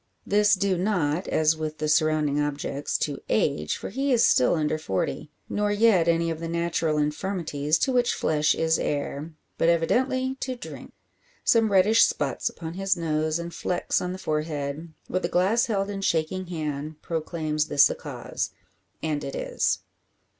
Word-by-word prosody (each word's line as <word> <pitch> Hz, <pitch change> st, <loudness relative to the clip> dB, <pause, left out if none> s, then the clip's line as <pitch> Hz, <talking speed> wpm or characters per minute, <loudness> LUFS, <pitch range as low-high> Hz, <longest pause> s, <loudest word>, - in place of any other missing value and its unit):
This 210 Hz, +1 st, +4 dB
due 190 Hz, -1 st, 0 dB
not, 180 Hz, -4 st, 0 dB
as 155 Hz, 0 st, +3 dB
with 155 Hz, -1 st, -4 dB
the 155 Hz, -, -2 dB
surrounding 155 Hz, -2 st, +2 dB
objects, 145 Hz, -1 st, -2 dB
to -, -, -2 dB
age; 75 Hz, 0 st, +1 dB
for -, -, -6 dB
he 275 Hz, +1 st, -1 dB
is 235 Hz, -2 st, +5 dB
still 125 Hz, -, +4 dB
under 155 Hz, -1 st, 0 dB
forty. 95 Hz, +3 st, -2 dB, 0.2 s
Nor 210 Hz, 0 st, 0 dB
yet 205 Hz, -5 st, +4 dB
any 170 Hz, 0 st, +2 dB
of 160 Hz, -, -4 dB
the 165 Hz, -, -4 dB
natural 170 Hz, -2 st, 0 dB
infirmities 150 Hz, -1 st, 0 dB
to 265 Hz, -, +1 dB
which 245 Hz, -1 st, +2 dB
flesh 150 Hz, -1 st, +2 dB
is 160 Hz, 0 st, +1 dB
heir; 145 Hz, +2 st, -3 dB, 0.2 s
but 165 Hz, -, +4 dB
evidently 260 Hz, +10 st, +1 dB
to 260 Hz, -1 st, -3 dB
drink. 245 Hz, -, -9 dB, 0.5 s
Some 225 Hz, -2 st, +3 dB
reddish 200 Hz, +4 st, +5 dB
spots 140 Hz, -4 st, 0 dB
upon 160 Hz, -1 st, -7 dB
his 195 Hz, 0 st, 0 dB
nose 155 Hz, -1 st, 0 dB
and 170 Hz, 0 st, -6 dB
flecks 180 Hz, -, -1 dB
on 180 Hz, -, -2 dB
the 185 Hz, -, -5 dB
forehead, 150 Hz, -1 st, -3 dB, 0.2 s
with 185 Hz, -, -1 dB
the 170 Hz, -, -1 dB
glass 215 Hz, +9 st, +2 dB
held 195 Hz, -3 st, 0 dB
in 195 Hz, -1 st, -4 dB
shaking 180 Hz, +1 st, 0 dB
hand, 155 Hz, -2 st, -4 dB
proclaims 155 Hz, -2 st, -2 dB
this 140 Hz, -, +6 dB
the -, -, +2 dB
cause. -, -, -5 dB, 0.5 s
And 150 Hz, -2 st, -1 dB
it 135 Hz, -, -5 dB
is. -, -, 0 dB
165 Hz, 170 wpm, -26 LUFS, 150-195 Hz, 0.5 s, this